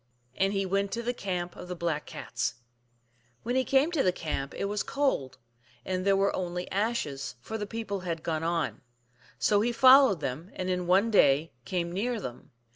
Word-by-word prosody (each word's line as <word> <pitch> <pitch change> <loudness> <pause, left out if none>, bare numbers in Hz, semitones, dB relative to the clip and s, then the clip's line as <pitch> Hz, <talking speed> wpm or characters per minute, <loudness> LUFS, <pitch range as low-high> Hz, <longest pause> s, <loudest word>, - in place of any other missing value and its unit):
And 195 +1 +1
he 195 -1 0
went 195 +1 0
to 235 - -2
the 245 +1 -1
camp 180 -5 -3
of - - -9
the 180 - -4
Black 165 -3 -2
Cats. - - -3 0.9
When 245 +2 -1
he 260 - +3
came 275 +5 +3
to 320 -5 +1
the 185 - +3
camp 150 -5 -4
it - - -2
was 205 +1 -1
cold, 270 - -1 0.5
and 185 -1 -1
there 195 - +5
were 195 +1 +2
only 180 -1 -3
ashes, 195 - -2
for 130 - -7
the 210 -2 -3
people 220 -3 -4
had 165 -3 -4
gone 160 -2 -1
on. 165 -1 -1 0.6
So 205 -1 +3
he 240 +3 +1
followed 255 - +7
them, 150 +6 -4
and 185 0 -2
in 180 -1 -1
one 195 +5 +4
day 150 -5 +4
came 175 -3 -2
near 225 +6 -1
them. 125 - -8
190 Hz, 195 wpm, -29 LUFS, 170-220 Hz, 0.9 s, followed